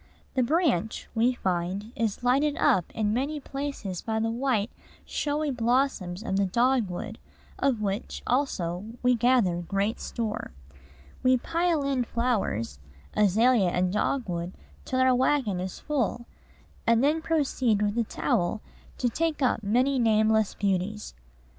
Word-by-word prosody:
"The 260 - +2
branch," 250 - +1
we 240 +2 +3
find, 185 +2 -2
is 225 0 -2
lighted 280 +4 +2
up 180 -3 +2
in 210 -1 0
many 280 +5 -1
places 275 -10 -5
by 220 -1 -2
the 225 0 0
white, 240 -3 0 0.3
showy 295 0 -1
blossoms 235 -6 0
of 195 -4 -1
the 200 -1 +2
dogwood, 225 -2 0 0.4
of 250 -6 +1
which, 200 +1 -3
also, 190 -10 -1 0.2
we 250 0 +5
gather 240 -7 +3
great 200 +5 -1
store. 220 - -4 0.7
We 255 0 +4
pile 335 +2 0
in 275 -3 +1
flowers 215 - -1 0.4
azalea 210 0 +4
and 180 +1 0
dogwood 185 -6 -1 0.3
till 260 - -1
our 260 0 +5
wagon 250 -6 +1
is 185 0 -4
full, 245 -5 -2 0.6
and 230 +1 +4
then 305 +3 +2
proceed 260 -9 +1
with 205 0 0
a 235 - +2
trowel 210 -1 -1 0.4
to 250 - +1
take 310 +4 -1
up 250 - +2
many 250 +6 +2
nameless 220 -2 +3
beauties. 200 +1 -2
230 Hz, 135 wpm, -27 LUFS, 200-260 Hz, 0.7 s, we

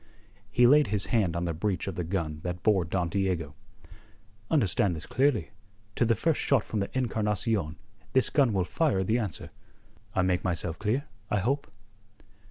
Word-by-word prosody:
He 120 +3 +4
laid 145 +4 +6
his 105 -1 0
hand 100 -8 +2
on 85 +1 -1
the 85 - -1
breech 90 +4 -1
of 95 - -2
the 90 - -3
gun 80 -3 -3
that 90 +1 -5
bore 100 -5 +3
Don 85 +2 -1
Diego. 90 -6 -1 1.0
"Understand 100 - +2
this 80 - -7
clearly: 130 -1 +1 0.4
to 120 - +2
the 115 0 +3
first 160 +8 0
shot 135 -6 +2
from 110 - -3
the 100 - -2
Encarnacion 105 -7 0 0.4
this 130 - +3
gun 135 -5 +3
will 95 -3 +1
fire 130 - +1
the 110 +5 +1
answer. 105 -9 -5 0.6
I 95 - +3
make 90 -1 +1
myself 85 -2 -2
clear, 110 +7 0 0.2
I 105 - +1
hope?" 135 +8 -1
100 Hz, 175 wpm, -28 LUFS, 90-120 Hz, 1.0 s, laid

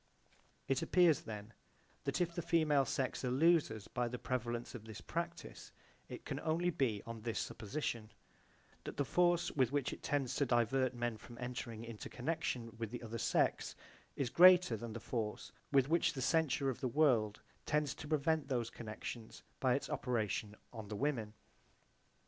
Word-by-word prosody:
It 135 0 +1
appears 175 -5 +4
then 105 0 -7 0.5
that - - 0
if 175 -1 +1
the 175 - -2
female 155 -5 +3
sex 130 +2 -1
are 125 - 0
losers 135 - +3
by 125 0 -1
the 125 +1 -4
prevalence 120 -1 -3
of 115 -3 -8
this 110 -2 -8
practise 170 0 -5 0.4
it - - -8
can - - -3
only 170 +3 +1
be 125 - 0
on 115 -1 -7
this 115 0 -3
supposition 115 -1 -3 0.7
that - - -7
the 145 - +1
force 175 +5 +3
with 130 -4 +2
which 145 -2 0
it - - -9
tends 140 -4 0
to 140 - +3
divert 125 +2 +2
men 120 -2 -2
from 120 +2 -12
entering 120 -2 -5
into 115 -2 -7
connection 125 -4 -3
with 115 -2 -2
the 120 +1 -6
other 115 0 -5
sex - - +1 0.4
is 130 -4 -1
greater 180 -7 +8
than 110 +1 -6
the 115 - -5
force 110 -2 -3 0.2
with 135 -2 +5
which 165 +3 +3
the 135 - -4
censure 140 -4 +2
of 125 - -8
the 130 - -1
world 120 -7 +3 0.3
tends 150 -2 +1
to 145 - -9
prevent 155 0 +1
those 120 -4 -1
connections 110 0 -7 0.2
by 130 -2 +3
its 140 - -2
operation 110 -3 -1 0.2
on 110 -3 -7
the 105 - -5
women. 115 -5 -1
125 Hz, 170 wpm, -36 LUFS, 115-150 Hz, 0.7 s, greater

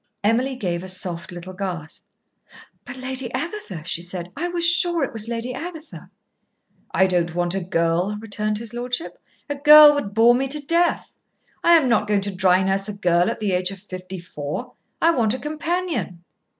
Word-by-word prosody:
Emily 245 +5 +1
gave 175 -8 -3
a 190 - -8
soft 185 -2 -4
little 175 +1 -8
gasp. 180 -5 -6 0.8
"But - - -8
Lady 260 -1 -4
Agatha," 265 - -5
she 170 0 -2
said. 175 0 -4
"I 335 +5 -2
was 345 -1 +1
sure 340 -1 +3
it 270 - -3
was 225 -1 -2
Lady 235 +2 -3
Agatha." 320 +2 -8 0.8
"I 190 - +3
don't 175 -2 0
want 175 0 0
a 195 - -1
girl," 175 +3 0
returned 210 -1 -2
his 230 +1 -8
lordship. 245 +5 -4 0.3
"A 290 - -2
girl 295 +1 +9
would 210 -9 -4
bore 230 +2 +6
me 265 +2 0
to 295 +3 -1
death. 335 +4 0 0.5
I 340 - +6
am 320 -6 +5
not 220 -3 +2
going 205 -1 +2
to 200 0 -3
dry 185 0 +3
nurse 195 +2 0
a - - -4
girl 175 -1 +2
at 230 - -4
the 210 -2 -1
age 180 0 0
of 195 - -7
fifty 185 -1 -8
four. 170 - -6 0.3
I 330 - +4
want 235 -7 +1
a - - -4
companion." 310 - -3
215 Hz, 190 wpm, -22 LUFS, 185-275 Hz, 0.8 s, girl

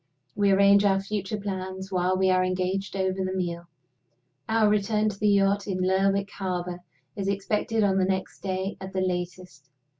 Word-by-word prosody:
We 200 -1 +2
arrange 200 +1 +5
our 195 -1 +3
future 200 +1 -3
plans 190 -1 -5
while 185 0 +1
we 190 0 +3
are 185 0 +3
engaged 185 +2 -2
over 190 0 -1
the 185 0 -2
meal. 170 -2 -3 0.8
Our 220 -1 +3
return 210 +1 +2
to 200 -1 -8
the 210 - +2
yacht 200 0 +2
in 190 -2 -2
Lerwick 195 +2 +1
harbor 180 -2 -4 0.4
is 195 -1 -3
expected 210 +3 0
on 195 -1 +2
the 185 - +3
next 190 0 -2
day 190 0 -3
at 190 0 -7
the 190 - 0
latest. 180 -5 -4
190 Hz, 175 wpm, -26 LUFS, 185-200 Hz, 0.8 s, arrange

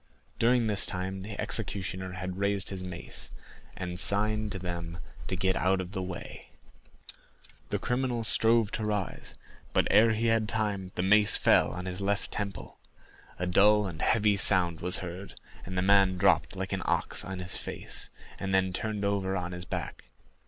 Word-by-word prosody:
During 120 0 +3
this 105 -3 +6
time 95 +1 -4
the 100 +1 -8
executioner 95 -3 -2
had 95 0 -5
raised 100 0 +1
his 95 -1 -4
mace, 90 -2 -4 0.5
and 90 -1 -5
signed 105 +2 +4
to 95 - -3
them 85 -2 -5 0.3
to - - -2
get 95 +1 +1
out 95 +1 +1
of 90 0 -5
the 95 -2 -4
way; 90 -1 -8 1.2
the - - 0
criminal 125 -2 -1
strove 115 0 +3
to 110 - -3
rise, 105 -3 -3 0.4
but, - - +2
ere 110 +1 +5
he 110 +2 -1
had 115 -1 +2
time, 105 -4 -2
the 90 - -1
mace 105 +2 +4
fell - - +4
on 90 - -6
his 90 +1 -4
left 100 +1 -1
temple. 100 -2 -6 0.6
A 90 - -2
dull 105 +4 +4
and 85 -4 -6
heavy 105 -2 +2
sound 90 -4 +4
was 90 +1 +1
heard, 90 +3 -9 0.3
and 95 -1 -5
the 90 - +1
man 95 -1 +4
dropped 95 +1 +2
like 95 0 -4
an 95 - -2
ox - - -1
on 95 0 -6
his 90 0 -5
face, - - -2 0.3
and 95 -1 -1
then 95 -1 +1
turned 105 +1 -3
over 95 -1 0
on 90 -1 -4
his 90 0 -5
back. - - -6
95 Hz, 175 wpm, -29 LUFS, 90-105 Hz, 1.2 s, this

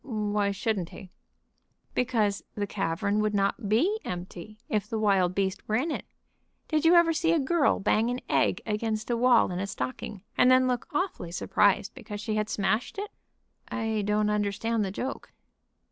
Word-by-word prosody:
"Why 210 -4 -1
shouldn't 200 -3 -2
he?" 185 -2 -11 0.8
"Because 220 -5 0
the 205 - -1
cavern 200 +1 -1
would 210 -1 0
not 200 +2 0
be 350 - +2
empty 180 +3 -7
if 210 -1 -1
the 225 - -2
wild 195 -4 +2
beast 190 -1 -1
were 215 - 0
in 285 +8 0
it. - - -4 0.6
Did 310 0 0
you 335 +2 +7
ever 340 -1 +5
see 330 +1 +2
a 330 - +3
girl 290 +2 +2
bang 220 +4 +2
an 245 +1 -2
egg - - +1
against 220 +1 -2
a - - +2
wall 240 -3 +4
in 180 - -3
a 200 - -2
stocking, 185 +7 -5
and 250 - +5
then 255 0 +5
look 250 -2 -1
awfully 295 - -2
surprised 175 - +2
because 210 -2 -8
she 215 +1 -3
had 215 0 -1
smashed 215 - -1
it?" 410 +1 -4 0.6
"I 220 -2 -1
don't 210 +1 +1
understand 210 +2 0
the 195 - -2
joke." 255 +8 -5
215 Hz, 175 wpm, -28 LUFS, 200-250 Hz, 0.8 s, you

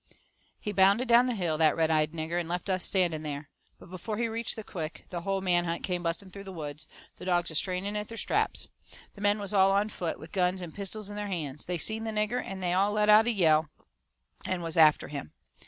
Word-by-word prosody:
He 210 - -4
bounded 200 +5 +4
down 240 +2 +6
the 250 - -1
hill, 170 -6 -1
that 155 -2 +5
red 160 -1 +2
eyed 155 -1 +2
nigger, 165 +1 -2
and 170 -1 -4
left 180 +3 -2
us 185 -1 +1
standing 175 -5 +1
there. 145 -1 -6 0.3
But 180 - -15
before 200 +4 -5
he 235 0 0
reached 230 0 -3
the 220 - -6
crick 165 -5 -6
the 175 -2 -4
whole 195 +2 -1
man 175 -2 +2
hunt 170 0 -3
come 180 -2 -1
busting 175 +3 -3
through 200 +1 -9
the 190 - -7
woods, 155 -2 -7 0.3
the - - -9
dogs 175 -2 +1
a - - -9
straining 185 +5 0
at 210 0 -3
their 230 - -8
straps. - - 0 0.5
The 200 - -13
men 205 +1 +3
was 205 0 -4
all 195 -1 +5
on 200 +2 +2
foot, 175 -5 -3
with 160 - -12
guns 185 -1 +1
and 175 -3 -7
pistols 205 +1 -4
in - - -7
their 205 0 -3
hands. 155 -7 -4
They 180 0 -1
seen 220 +6 -1
the 225 - -3
nigger, 215 +3 -1
and 190 -1 -6
they 175 -1 +1
all 200 +3 +2
let 210 0 +2
out 215 +2 +7
a - - +4
yell, 160 -7 +3 0.7
and 180 -2 -2
was 165 -1 -3
after 155 -2 +5
him. 140 - -7
185 Hz, 245 wpm, -29 LUFS, 165-205 Hz, 0.7 s, out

